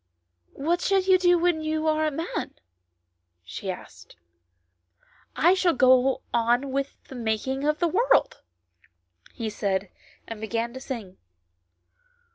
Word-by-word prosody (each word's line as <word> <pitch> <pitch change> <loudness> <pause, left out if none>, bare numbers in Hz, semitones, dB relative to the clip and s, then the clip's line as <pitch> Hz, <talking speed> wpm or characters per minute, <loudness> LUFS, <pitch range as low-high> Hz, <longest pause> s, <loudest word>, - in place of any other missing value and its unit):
" 85 0 -51
What 340 +5 -1
shall 390 -1 +2
you 375 0 +4
do 355 -1 +4
when 340 -2 +1
you 310 0 -2
are 310 0 +2
a - - +2
man? 320 +4 -4 0.5
" 90 0 -52 0.3
she 190 - -7
asked. 90 - -9 0.6
" 85 0 -51 0.4
I 345 +3 +5
shall 370 -4 +2
go 255 0 +4
on 240 +4 +1
with 275 +1 -3
the - - -13
making 245 +3 -2
of 300 0 +1
the 345 - +1
world," - - +2 0.9
he 230 -3 -5
said, 200 -2 -2 0.4
and 225 -2 -7
began 230 +2 -2
to 260 - -7
sing. 230 -9 -7
265 Hz, 145 wpm, -25 LUFS, 220-330 Hz, 0.9 s, I